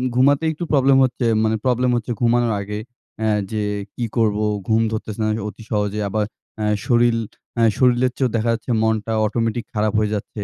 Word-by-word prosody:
ঘুমাতে 140 +4 +4
একটু 160 +2 -6
প্রবলেম 135 -1 +5
হচ্ছে। 125 -1 0 0.2
মানে 110 0 +2
প্রবলেম 125 0 +2
হচ্ছে 120 0 -2
ঘুমানোর 120 -1 +3
আগে 105 +1 -5 0.4
অ্যা 110 -1 +1 0.2
যে 110 -1 -1 0.3
কী 120 - -2
করব? 110 -3 +2 0.3
ঘুম 110 0 +3
ধরতেছে 110 -1 -5
না 110 - +1
কে 110 - -4
অতি 105 +2 -9
সহজে। 105 0 0
আবার 110 +1 0 0.3
অ্যা 105 -1 -1 0.2
শরীর, 120 -1 +3 0.4
অ্যা 115 - +1
শরীরের 125 0 +3
চেয়েও 130 -2 +1
দেখা 115 +1 +1
যাচ্ছে 115 +2 -4
মনটা 110 0 0
অটোমেটিক 115 +1 -1
খারাপ 105 -1 0
হয়ে 105 -1 0
যাচ্ছে 105 0 -5
115 Hz, 185 wpm, -21 LUFS, 110-120 Hz, 0.4 s, প্রবলেম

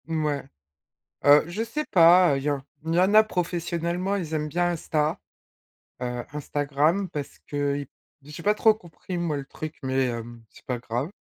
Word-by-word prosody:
Mouais, 155 -3 -1 0.8
heu, 145 +1 +8
je 205 +6 -2
sais 230 +7 -3
pas, 175 -2 +6
heu, - - 0
il 135 - -5
y 150 - +1
en 140 -2 -1 0.2
il 165 +1 0
y - - +4
en 190 +3 +3
a 215 0 +8
professionnellement, 175 0 -2
ils 165 -5 -4
aiment 150 -1 -1
bien 175 +3 +1
Insta, 155 -2 -1 0.8
heu, 125 -1 -3
Instagram, 150 +5 0
parce 145 -2 -6
que 145 -1 -1
i 140 -2 -5 0.4
j'ai 150 +3 -8
pas 210 +3 +3
trop 220 0 +5
compris 180 -2 -8
moi 170 -4 -1
le 140 - -4
truc 155 +3 -7
mais 130 0 +1
hem, 120 -1 -6
c'est - - -19
pas 125 -2 -2
grave. 120 +6 -3
155 Hz, 185 wpm, -25 LUFS, 140-175 Hz, 0.8 s, heu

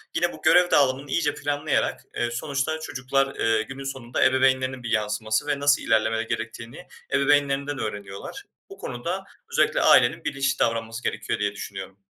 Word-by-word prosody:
yine 175 +1 +1
bu - - -12
görev 180 0 +5
dağılımını 135 0 +2
iyice 150 -2 +1
planlayarak 145 +1 -1
eee, 120 0 -1
sonuçta 140 +5 -2
çocuklar, 135 -2 -1
eee, 115 -1 +2
günün 135 +5 -7
sonunda 130 -3 -2
ebeveynlerinin 130 -1 +2
bir 120 - -4
yansıması 110 +3 0
ve 145 -1 0
nasıl 145 0 +3
ilerlemeleri 110 0 +1
gerektiğini 115 +8 -6 0.3
ebeveynlerinden 140 0 +2
öğreniyorlar. 105 - -6 0.3
Bu 395 - -11
konuda 170 +11 -4 0.3
özellikle - - +2
ailenin 120 -1 +5
bilinçli 135 -1 -1
davranması 115 0 -1
gerekiyor - - -2
diye 105 -1 0
düşünüyorum. 95 -2 -8
130 Hz, 150 wpm, -25 LUFS, 115-145 Hz, 0.3 s, görev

